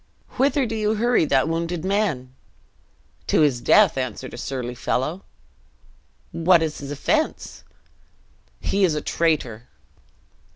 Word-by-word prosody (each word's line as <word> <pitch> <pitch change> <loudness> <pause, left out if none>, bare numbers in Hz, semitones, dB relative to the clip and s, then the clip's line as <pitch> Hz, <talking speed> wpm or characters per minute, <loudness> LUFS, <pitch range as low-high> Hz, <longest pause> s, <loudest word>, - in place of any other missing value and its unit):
"Whither 275 +1 +2
do 225 - -4
you 215 0 0
hurry 235 -4 +2
that 135 -1 +2
wounded 165 +1 -2
man?" 185 -11 -1 0.9
"To - - +3
his 135 -5 +2
death," 195 - +4
answered 130 -4 -5
a - - -7
surly 125 -2 -4
fellow. 150 +9 -2 1.1
"What 170 0 +3
is 155 -1 -3
his 140 - -7
offense?" 310 - -2 1.0
"He 200 0 0
is 170 -5 +3
a 150 - -2
traitor." 130 -11 -1
165 Hz, 125 wpm, -23 LUFS, 135-205 Hz, 1.1 s, death